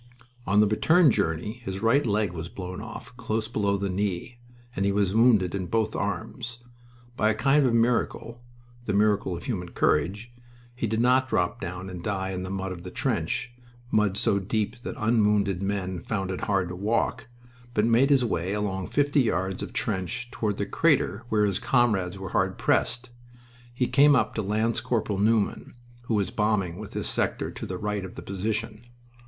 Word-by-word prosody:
On 105 Hz, +2 st, +4 dB
the 105 Hz, -, +5 dB
return 160 Hz, -, +4 dB
journey 105 Hz, +9 st, -1 dB
his 95 Hz, 0 st, -5 dB
right 130 Hz, +6 st, +4 dB
leg 105 Hz, -5 st, 0 dB
was 85 Hz, 0 st, -6 dB
blown 90 Hz, +1 st, -6 dB
off 125 Hz, +2 st, -9 dB
close 110 Hz, 0 st, -2 dB
below 100 Hz, -3 st, 0 dB
the 100 Hz, 0 st, -2 dB
knee 100 Hz, +4 st, -3 dB, 0.4 s
and 95 Hz, -, 0 dB
he 100 Hz, -, +2 dB
was 100 Hz, -1 st, +1 dB
wounded 110 Hz, -6 st, +4 dB
in 95 Hz, -2 st, -3 dB
both 110 Hz, +2 st, 0 dB
arms. 115 Hz, +5 st, -4 dB, 0.6 s
By 110 Hz, -, +2 dB
a 110 Hz, -, +1 dB
kind 135 Hz, +4 st, +3 dB
of 120 Hz, -, +1 dB
miracle 115 Hz, 0 st, 0 dB, 0.4 s
the 105 Hz, -, -1 dB
miracle 105 Hz, -3 st, +2 dB
of -, -, -10 dB
human 90 Hz, -8 st, -3 dB
courage 105 Hz, +9 st, 0 dB, 0.4 s
he 120 Hz, -1 st, -2 dB
did 110 Hz, +1 st, -1 dB
not 130 Hz, +2 st, +3 dB
drop 90 Hz, -6 st, 0 dB
down 90 Hz, +2 st, -5 dB
and 90 Hz, -2 st, -7 dB
die 95 Hz, -1 st, -2 dB
in 90 Hz, -1 st, -3 dB
the 90 Hz, -, -5 dB
mud 95 Hz, 0 st, -3 dB
of 90 Hz, -2 st, -7 dB
the 90 Hz, -, -7 dB
trench, 120 Hz, +6 st, -2 dB, 0.4 s
mud 105 Hz, -2 st, +2 dB
so 105 Hz, -2 st, +2 dB
deep 110 Hz, +4 st, -2 dB
that -, -, -6 dB
unwounded 105 Hz, -4 st, +2 dB
men 95 Hz, -3 st, -2 dB
found 95 Hz, -1 st, -2 dB
it 95 Hz, -, -3 dB
hard 95 Hz, -3 st, +1 dB
to 90 Hz, -, -5 dB
walk 115 Hz, +5 st, -1 dB, 0.5 s
but 105 Hz, -, +3 dB
made 120 Hz, +4 st, +4 dB
his 135 Hz, -3 st, +4 dB
way 95 Hz, -3 st, -1 dB
along 95 Hz, -3 st, -2 dB
fifty 145 Hz, 0 st, +2 dB
yards 95 Hz, -5 st, -1 dB
of -, -, -5 dB
trench 95 Hz, +6 st, -3 dB
toward 105 Hz, -5 st, -2 dB
the 100 Hz, -, -1 dB
crater 120 Hz, -, +1 dB
where 105 Hz, -1 st, +3 dB
his 100 Hz, -2 st, 0 dB
comrades 105 Hz, -8 st, +1 dB
were 95 Hz, -1 st, -6 dB
hard 95 Hz, +1 st, 0 dB
pressed. 125 Hz, 0 st, 0 dB, 0.6 s
He 125 Hz, +1 st, 0 dB
came 140 Hz, +3 st, +5 dB
up 110 Hz, -4 st, +1 dB
to 110 Hz, -, -1 dB
Lance 110 Hz, +3 st, 0 dB
corporal 105 Hz, -4 st, -1 dB
Newman, 110 Hz, +2 st, +1 dB, 0.3 s
who 115 Hz, -, 0 dB
was 100 Hz, -3 st, 0 dB
bombing 105 Hz, -5 st, 0 dB
with 105 Hz, -1 st, -8 dB
his -, -, -2 dB
sector -, -, -1 dB
to -, -, -7 dB
the 90 Hz, -, -4 dB
right 105 Hz, 0 st, -2 dB
of 95 Hz, -, -8 dB
the -, -, -8 dB
position. 105 Hz, +3 st, -3 dB
105 Hz, 190 wpm, -26 LUFS, 95-115 Hz, 0.6 s, the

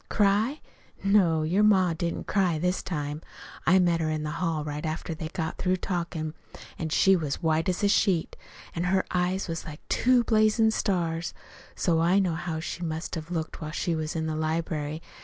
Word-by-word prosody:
"Cry? 215 Hz, +7 st, +2 dB, 0.4 s
No, 185 Hz, -6 st, +4 dB
your 175 Hz, +6 st, +2 dB
ma 190 Hz, -5 st, +4 dB
didn't 170 Hz, +1 st, -3 dB
cry 185 Hz, -5 st, +1 dB
this 180 Hz, +3 st, 0 dB
time. 150 Hz, -3 st, -4 dB, 0.5 s
I 185 Hz, -, +6 dB
met 175 Hz, -2 st, +3 dB
her 155 Hz, -, 0 dB
in 155 Hz, -1 st, -2 dB
the 150 Hz, -, -3 dB
hall 165 Hz, -4 st, 0 dB
right 150 Hz, 0 st, -5 dB
after 160 Hz, +1 st, -3 dB
they 160 Hz, 0 st, -5 dB
got 160 Hz, -1 st, -4 dB
through 185 Hz, 0 st, +1 dB
talkin', 170 Hz, -4 st, -3 dB, 0.5 s
an' 160 Hz, -, -2 dB
she 190 Hz, +5 st, +5 dB
was 155 Hz, -4 st, -3 dB
white 160 Hz, +1 st, +2 dB
as 180 Hz, +2 st, -1 dB
a -, -, +5 dB
sheet, 195 Hz, -4 st, +2 dB, 0.4 s
an' 170 Hz, +1 st, -2 dB
her 190 Hz, +1 st, +2 dB
eyes 180 Hz, +2 st, 0 dB
was 165 Hz, -1 st, -4 dB
like 150 Hz, -1 st, -10 dB
two 250 Hz, -1 st, +4 dB
blazin' 220 Hz, 0 st, +3 dB
stars. 170 Hz, -6 st, -1 dB, 0.4 s
So 165 Hz, -3 st, +1 dB
I 175 Hz, +4 st, +3 dB
know 185 Hz, -4 st, +2 dB
how 160 Hz, -1 st, -3 dB
she 170 Hz, +2 st, -5 dB
must 160 Hz, -1 st, -4 dB
have 160 Hz, -1 st, -5 dB
looked 165 Hz, -2 st, -4 dB
while 155 Hz, -, -4 dB
she 165 Hz, +2 st, -1 dB
was 155 Hz, 0 st, -3 dB
in 160 Hz, -1 st, -1 dB
the 155 Hz, -1 st, -2 dB
library. 155 Hz, -1 st, -2 dB
170 Hz, 195 wpm, -27 LUFS, 160-190 Hz, 0.5 s, I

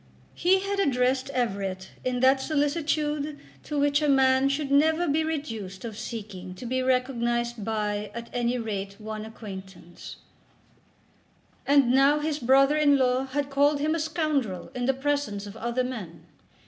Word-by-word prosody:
He 375 Hz, +2 st, +3 dB
had 395 Hz, 0 st, -2 dB
addressed 260 Hz, -5 st, +1 dB
Everett 195 Hz, -7 st, -2 dB
in 250 Hz, -1 st, -1 dB
that 265 Hz, +1 st, +5 dB
solicitude 295 Hz, 0 st, -1 dB, 0.2 s
to 300 Hz, -, -5 dB
which 285 Hz, +1 st, +2 dB
a 300 Hz, -, +2 dB
man 265 Hz, 0 st, +4 dB
should 275 Hz, 0 st, -2 dB
never 315 Hz, +4 st, +3 dB
be 310 Hz, +2 st, +2 dB
reduced 225 Hz, -12 st, -4 dB
of 225 Hz, -2 st, -6 dB
seeking 200 Hz, -5 st, -7 dB
to 245 Hz, -, -9 dB
be 255 Hz, +2 st, -1 dB
recognised 240 Hz, -3 st, 0 dB
by 210 Hz, -1 st, -2 dB
at 235 Hz, 0 st, -6 dB
any 245 Hz, 0 st, 0 dB
rate 200 Hz, -4 st, -4 dB
one 215 Hz, 0 st, -6 dB
acquaintance, 190 Hz, -5 st, -10 dB, 1.5 s
and 280 Hz, -3 st, +5 dB
now 275 Hz, +3 st, +5 dB
his 300 Hz, 0 st, -2 dB
brother 270 Hz, +4 st, +4 dB
in 290 Hz, -2 st, +5 dB
law 255 Hz, 0 st, +2 dB
had 280 Hz, +1 st, -2 dB
called 285 Hz, +1 st, +3 dB
him 305 Hz, +2 st, +1 dB
a 330 Hz, -, -1 dB
scoundrel 300 Hz, -, -1 dB
in 245 Hz, 0 st, -2 dB
the 270 Hz, -, +2 dB
presence 270 Hz, -7 st, -1 dB
of 205 Hz, +1 st, -9 dB
other 235 Hz, +3 st, -1 dB
men. 195 Hz, -11 st, -7 dB
260 Hz, 155 wpm, -26 LUFS, 220-290 Hz, 1.5 s, that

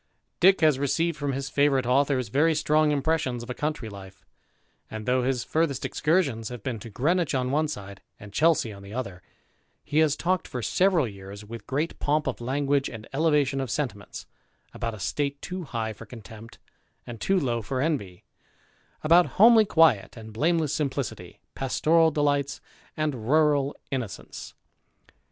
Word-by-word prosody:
Dick 190 Hz, +1 st, +5 dB
has 155 Hz, -4 st, +4 dB
received 165 Hz, +4 st, 0 dB
from 145 Hz, -2 st, -2 dB
his 135 Hz, +1 st, -3 dB
favourite 140 Hz, -3 st, +2 dB
authors 130 Hz, -2 st, +1 dB
very 155 Hz, +7 st, +3 dB
strong 155 Hz, 0 st, +2 dB
impressions 140 Hz, -4 st, 0 dB
of 120 Hz, -, -6 dB
a -, -, -2 dB
country 150 Hz, -4 st, -3 dB
life; 95 Hz, -2 st, -11 dB, 0.6 s
and 110 Hz, -1 st, -6 dB
though 125 Hz, 0 st, +2 dB
his 125 Hz, -1 st, 0 dB
furthest 155 Hz, -5 st, -1 dB
excursions 150 Hz, -, 0 dB
have 120 Hz, -4 st, -8 dB
been 120 Hz, -4 st, -3 dB
to 115 Hz, -, -9 dB
Greenwich 155 Hz, -, 0 dB
on 130 Hz, -1 st, 0 dB
one 155 Hz, +2 st, +1 dB
side, 100 Hz, -8 st, -8 dB, 0.2 s
and 100 Hz, 0 st, -12 dB
Chelsea 155 Hz, -8 st, +2 dB
on 100 Hz, -, -12 dB
the 100 Hz, +3 st, -10 dB
other, 100 Hz, -8 st, -5 dB, 0.6 s
he 150 Hz, -, 0 dB
has 155 Hz, -2 st, +3 dB
talked 180 Hz, +2 st, -1 dB
for 125 Hz, -2 st, -5 dB
several 180 Hz, -, +2 dB
years, 100 Hz, 0 st, -10 dB
with 115 Hz, +2 st, -9 dB
great 150 Hz, +5 st, -2 dB
pomp 150 Hz, +1 st, +1 dB
of 130 Hz, -2 st, -3 dB
language 140 Hz, +2 st, 0 dB
and 110 Hz, -2 st, -9 dB
elevation 145 Hz, -2 st, +2 dB
of 135 Hz, -, -4 dB
sentiments, 115 Hz, -8 st, -4 dB, 0.5 s
about 115 Hz, -1 st, -4 dB
a -, -, -12 dB
state 140 Hz, +7 st, -2 dB
too 185 Hz, +1 st, -6 dB
high 115 Hz, -4 st, -3 dB
for 100 Hz, -, -12 dB
contempt 115 Hz, -1 st, -12 dB, 0.5 s
and 115 Hz, -2 st, -9 dB
too 195 Hz, -1 st, +2 dB
low 120 Hz, -6 st, -1 dB
for 130 Hz, +5 st, -3 dB
envy, 130 Hz, -, -2 dB, 0.8 s
about 170 Hz, +3 st, +5 dB
homely 225 Hz, +1 st, +7 dB
quiet 160 Hz, -, +3 dB
and 110 Hz, -1 st, -10 dB
blameless 155 Hz, +4 st, +1 dB
simplicity, 140 Hz, -4 st, -4 dB
pastoral 160 Hz, +5 st, +2 dB
delights 145 Hz, -2 st, 0 dB, 0.4 s
and 135 Hz, -7 st, -2 dB
rural 150 Hz, -2 st, +3 dB, 0.2 s
innocence. 125 Hz, -7 st, -6 dB
135 Hz, 165 wpm, -26 LUFS, 115-155 Hz, 0.8 s, homely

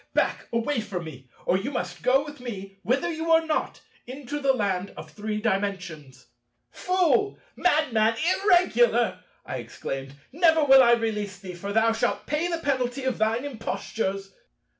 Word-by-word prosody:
back! -, -, 0 dB
Away 230 Hz, +3 st, 0 dB
from 190 Hz, -5 st, -5 dB
me, 135 Hz, -5 st, -11 dB, 0.2 s
or 185 Hz, -, +2 dB
you 210 Hz, -, -3 dB
must 180 Hz, -, -4 dB
go 270 Hz, -, +3 dB
with 295 Hz, -2 st, -10 dB
me—wither 235 Hz, -, -3 dB
you 320 Hz, +1 st, -4 dB
know 325 Hz, 0 st, +6 dB
not—into 290 Hz, -3 st, -4 dB
the 275 Hz, -1 st, +3 dB
Land 200 Hz, -6 st, -1 dB
of -, -, -9 dB
Three 215 Hz, 0 st, -4 dB
Dimensions!" 185 Hz, -, -3 dB, 0.5 s
"Fool! 370 Hz, +2 st, +1 dB, 0.2 s
Madman! 250 Hz, -10 st, +2 dB, 0.3 s
Irregular!" 390 Hz, +5 st, +3 dB, 0.3 s
I -, -, -4 dB
exclaimed; 135 Hz, 0 st, -6 dB, 0.2 s
"never 320 Hz, +1 st, +4 dB
will 270 Hz, -2 st, +8 dB
I 235 Hz, -2 st, +6 dB
release 210 Hz, -4 st, -1 dB
thee; 190 Hz, -1 st, -9 dB
thou 200 Hz, +5 st, +1 dB
shalt 225 Hz, -, -1 dB
pay 300 Hz, +4 st, -1 dB
the 340 Hz, -1 st, -1 dB
penalty 265 Hz, -4 st, -1 dB
of 260 Hz, -3 st, -1 dB
thine 225 Hz, +4 st, +1 dB
impostures." 195 Hz, -4 st, -4 dB
230 Hz, 145 wpm, -26 LUFS, 195-290 Hz, 0.5 s, will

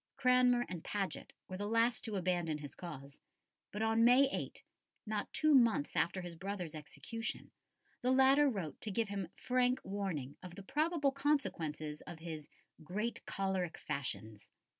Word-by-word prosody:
Cranmer 250 Hz, -2 st, +4 dB
and 175 Hz, -3 st, -6 dB
Paget 200 Hz, -2 st, -3 dB, 0.2 s
were 185 Hz, -, -5 dB
the 205 Hz, +1 st, -3 dB
last 230 Hz, +2 st, +3 dB
to 220 Hz, -3 st, -3 dB
abandon 175 Hz, -4 st, 0 dB
his 145 Hz, -3 st, -7 dB
cause, 140 Hz, -5 st, -8 dB, 0.5 s
but 210 Hz, +2 st, -2 dB
on 225 Hz, +1 st, +3 dB
May 250 Hz, +4 st, +7 dB
8 -, -, -4 dB, 0.4 s
not 215 Hz, -1 st, -2 dB
two 310 Hz, -1 st, +4 dB
months 230 Hz, -, +4 dB
after 180 Hz, +3 st, +1 dB
his 175 Hz, -1 st, -6 dB
brother's 185 Hz, -2 st, -4 dB
execution 225 Hz, +9 st, -5 dB, 0.5 s
the 250 Hz, -, +1 dB
latter 265 Hz, +2 st, +6 dB
wrote 190 Hz, -, -4 dB
to 220 Hz, -, -1 dB
give 215 Hz, +1 st, 0 dB
him 195 Hz, -3 st, -3 dB
frank 250 Hz, 0 st, +2 dB
warning 185 Hz, -9 st, -3 dB
of 180 Hz, -2 st, -9 dB
the 200 Hz, -, -8 dB
probable 300 Hz, -, +1 dB
consequences 165 Hz, -, -1 dB
of 170 Hz, -, -7 dB
his 160 Hz, -2 st, -7 dB, 0.4 s
"great 210 Hz, +9 st, -3 dB
cholerick 190 Hz, -3 st, -1 dB
fashions." 110 Hz, -6 st, -4 dB
200 Hz, 155 wpm, -35 LUFS, 165-245 Hz, 0.5 s, May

